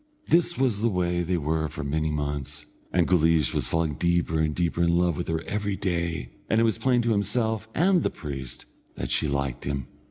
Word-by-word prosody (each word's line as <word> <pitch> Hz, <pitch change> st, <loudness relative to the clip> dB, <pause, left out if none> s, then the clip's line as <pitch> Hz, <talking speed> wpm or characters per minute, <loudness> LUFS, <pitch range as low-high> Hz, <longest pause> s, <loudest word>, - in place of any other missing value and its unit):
This 170 Hz, +1 st, +3 dB
was 125 Hz, -6 st, +1 dB
the 115 Hz, -, +3 dB
way 90 Hz, -3 st, 0 dB
they 90 Hz, +1 st, 0 dB
were 80 Hz, 0 st, 0 dB
for 70 Hz, -, -6 dB
many 80 Hz, +2 st, -1 dB
months, 75 Hz, 0 st, -4 dB, 0.3 s
and 90 Hz, -1 st, +2 dB
Guleesh 80 Hz, -4 st, +3 dB
was -, -, -1 dB
falling 80 Hz, -2 st, 0 dB
deeper 85 Hz, 0 st, +1 dB
and 80 Hz, -1 st, 0 dB
deeper 85 Hz, -1 st, 0 dB
in 85 Hz, 0 st, +3 dB
love 90 Hz, -2 st, +2 dB
with 90 Hz, -, -4 dB
her 80 Hz, 0 st, -1 dB
every 105 Hz, -1 st, -2 dB
day, 85 Hz, -4 st, -2 dB, 0.2 s
and 110 Hz, -, +3 dB
it -, -, +4 dB
was 115 Hz, -1 st, +1 dB
plain 125 Hz, 0 st, +2 dB
to 115 Hz, -, +1 dB
himself 110 Hz, +1 st, 0 dB
and 180 Hz, +1 st, +4 dB
the -, -, +1 dB
priest 65 Hz, -4 st, -7 dB, 0.3 s
that 60 Hz, -, -4 dB
she -, -, +2 dB
liked 70 Hz, -3 st, -2 dB
him. 70 Hz, -2 st, -2 dB
85 Hz, 210 wpm, -26 LUFS, 75-105 Hz, 0.3 s, it